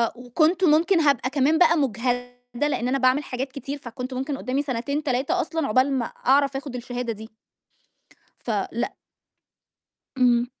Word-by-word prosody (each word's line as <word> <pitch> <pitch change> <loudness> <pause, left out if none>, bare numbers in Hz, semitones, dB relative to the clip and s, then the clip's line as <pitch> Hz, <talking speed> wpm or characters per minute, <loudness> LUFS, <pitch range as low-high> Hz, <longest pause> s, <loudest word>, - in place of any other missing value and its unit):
وكنت 310 +9 +1
ممكن 335 +3 +4
هابقى 280 -5 +2
كمان 285 +3 +2
بقى 335 0 +5
مُجهدة 245 0 -2
لإن 245 -4 -1
أنا 265 +2 +1
باعمل 260 +2 +3
حاجات 260 0 -4
كتير، 275 +1 -6
فكنت 255 -1 -7
ممكن 270 +2 -3
قدّامي 265 +1 -1
سنتين، 280 +2 -2
3 285 +6 0
أصلًا 325 -4 -2
عقبال 255 +5 +3
ما 255 -3 0
أعرف 275 +3 +1
آخُد 275 -2 -7
الشهادة 245 -1 -4
دي. 220 +1 -11 1.2
فلأ. 225 +2 -2 1.2
امم. 245 -2 +3
260 Hz, 140 wpm, -24 LUFS, 245-290 Hz, 1.2 s, بقى